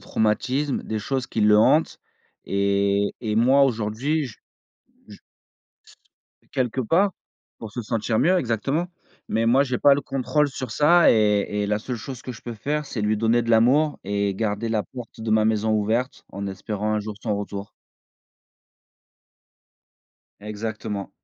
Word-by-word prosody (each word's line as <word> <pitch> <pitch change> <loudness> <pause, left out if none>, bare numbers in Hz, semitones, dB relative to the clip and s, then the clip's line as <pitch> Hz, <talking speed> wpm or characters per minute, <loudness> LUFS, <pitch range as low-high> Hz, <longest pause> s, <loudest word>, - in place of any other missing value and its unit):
traumatismes, 130 +6 0
des 110 -1 -3
choses 130 +4 -2
qui - - -2
le 105 0 +6
hantent 155 +8 +3 0.5
et 100 0 +1
et 110 -2 -2
moi 130 +4 +5
aujourd'hui 125 +6 -1
j 115 - -11 0.7
je - - -13 1.2
Et - - -32
quelque 130 -1 -1
part 180 - +2 0.5
pour 110 -2 -8
se 120 - -4
sentir 110 0 -1
mieux 185 +3 +3
exactement, 135 +6 -1 0.4
mais 115 +1 0
moi 130 +4 +5
j'ai 130 -3 -2
pas 140 -1 +6
le 140 - -1
contrôle 145 +2 0
sur 130 -3 -6
ça 165 +7 +5
et 105 -1 +2
et - - -1
la 105 +1 0
seule 120 +3 -5
chose 125 +2 -8
que 125 - -6
je 115 - -13
peux 120 - -6
faire 150 +7 -2
c'est 115 - -5
lui 105 +1 +1
donner 115 +2 +2
de 115 - -3
l'amour 130 +7 +3
et 100 0 -1
garder 105 +2 -2
la 110 -2 0
porte 120 -3 -11
de 110 - -3
ma 110 0 +3
maison 110 0 +1
ouverte 110 +5 -1
en 100 +1 -5
espérant 105 +2 -3
un 105 - 0
jour 105 0 -6
son 105 -3 -1
retour. 100 0 -6 2.7
Exactement. 105 -1 -5
110 Hz, 160 wpm, -23 LUFS, 105-130 Hz, 2.7 s, le